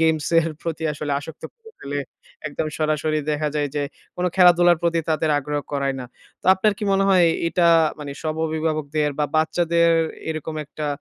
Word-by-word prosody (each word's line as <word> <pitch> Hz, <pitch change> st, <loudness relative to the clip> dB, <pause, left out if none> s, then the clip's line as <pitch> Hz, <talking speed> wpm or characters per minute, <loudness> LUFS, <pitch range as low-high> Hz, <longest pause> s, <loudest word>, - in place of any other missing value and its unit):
গেমসের 160 Hz, +1 st, +2 dB
প্রতি 165 Hz, -1 st, -4 dB
আসলে 145 Hz, 0 st, -4 dB
আসক্ত 160 Hz, +3 st, -11 dB
করে 455 Hz, -2 st, -17 dB
ফেলে 145 Hz, +1 st, -4 dB, 0.5 s
একদম 155 Hz, +1 st, -3 dB
সরাসরি 155 Hz, 0 st, 0 dB
দেখা 150 Hz, 0 st, 0 dB
যায় 145 Hz, -1 st, 0 dB
যে 145 Hz, -, 0 dB, 0.3 s
কোনো 180 Hz, 0 st, 0 dB
খেলাধুলার 175 Hz, -1 st, +6 dB
প্রতি 170 Hz, -1 st, +1 dB
তাদের 155 Hz, 0 st, +1 dB
আগ্রহ 145 Hz, +1 st, -3 dB
করায় 140 Hz, -1 st, 0 dB
না। -, -, -6 dB, 0.4 s
তো -, -, -10 dB
আপনার 205 Hz, +2 st, +2 dB
কি 210 Hz, -, -3 dB
মনে 195 Hz, 0 st, +3 dB
হয়? 180 Hz, -3 st, +5 dB, 0.2 s
এটা 175 Hz, 0 st, +2 dB, 0.3 s
মানে 145 Hz, -1 st, -6 dB
সব 155 Hz, -1 st, -2 dB
অভিভাবকদের 155 Hz, -1 st, -1 dB
বা 150 Hz, -, +2 dB
বাচ্চাদের 170 Hz, +1 st, +2 dB, 0.4 s
এরকম 155 Hz, 0 st, -4 dB
একটা 150 Hz, +1 st, -6 dB
155 Hz, 170 wpm, -22 LUFS, 150-170 Hz, 0.5 s, খেলাধুলার